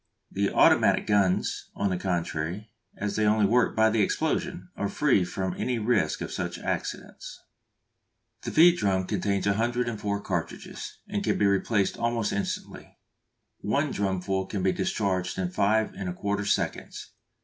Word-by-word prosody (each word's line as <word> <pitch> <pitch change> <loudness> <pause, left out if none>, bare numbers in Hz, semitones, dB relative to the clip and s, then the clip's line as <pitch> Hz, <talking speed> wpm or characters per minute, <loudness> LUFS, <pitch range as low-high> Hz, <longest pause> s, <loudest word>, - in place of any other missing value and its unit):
The 100 0 0
automatic - - +4
guns, 100 -3 +1
on 100 -1 0
the 90 - 0
contrary, 90 +2 -3 0.3
as 105 0 -3
they 110 - +1
only 105 0 +4
work 120 +4 +2
by 110 0 +4
the 110 -1 +2
explosion, 90 -2 -1
are 100 - -2
free 135 -9 +2
from 95 +1 -3
any 125 -1 -1
risk 110 -1 +1
of - - -4
such - - -3
accidents. - - -5 1.0
The - - -4
feed 175 +2 +6
drums 95 -2 +1
contain 100 +1 -1
104 110 -1 -1
cartridges, - - -5
and - - -2
can - - +1
be 105 - +2
replaced 100 +1 +1
almost 115 -2 0
instantly. 100 - -5 0.6
One - - 0
drumful 95 -1 -1
can 100 -3 -3
be 95 - +3
discharged 95 -3 -1
in 90 -2 -2
5 110 +3 +2
1/4 100 +2 -3
seconds. - - -3
100 Hz, 145 wpm, -27 LUFS, 95-110 Hz, 1.0 s, feed